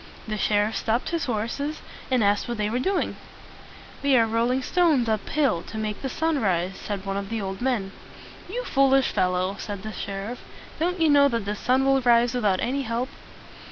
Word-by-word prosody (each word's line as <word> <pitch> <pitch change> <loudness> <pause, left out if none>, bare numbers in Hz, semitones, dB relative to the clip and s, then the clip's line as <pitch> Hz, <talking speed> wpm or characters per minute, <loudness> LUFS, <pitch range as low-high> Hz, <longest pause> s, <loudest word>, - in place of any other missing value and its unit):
The 215 - -2
sheriff 210 +1 +1
stopped 230 +2 0
his 335 -1 -1
horses, 250 +6 -3 0.3
and 255 -4 +2
asked 205 +3 +2
what 240 -1 -3
they 210 0 -1
were 245 - 0
doing. 380 +8 -1 0.8
"We 280 -2 +4
are 230 - +5
rolling 235 +4 +1
stones 315 -7 +2
up 215 -2 -1
hill 270 - +1
to 220 - -7
make 215 -1 -3
the 270 - -3
sun 320 +1 0
rise," 185 -2 0
said 200 -2 -5
one 195 0 -2
of 200 0 -4
the 230 - -2
old 195 0 -5
men. 240 -7 0 0.6
"You - - -3
foolish 270 - +3
fellow!" 185 +2 0
said 205 -2 -6
the 215 - -5
sheriff. 200 +3 -5 0.4
"Don't 355 +3 0
you 325 - +4
know 285 -1 +6
that 230 -6 -2
the 205 +1 -2
sun 255 +5 +1
will 270 0 +3
rise 240 -1 +4
without 210 -7 +1
any 270 +3 0
help?" 240 +1 -2
235 Hz, 195 wpm, -25 LUFS, 205-270 Hz, 0.8 s, know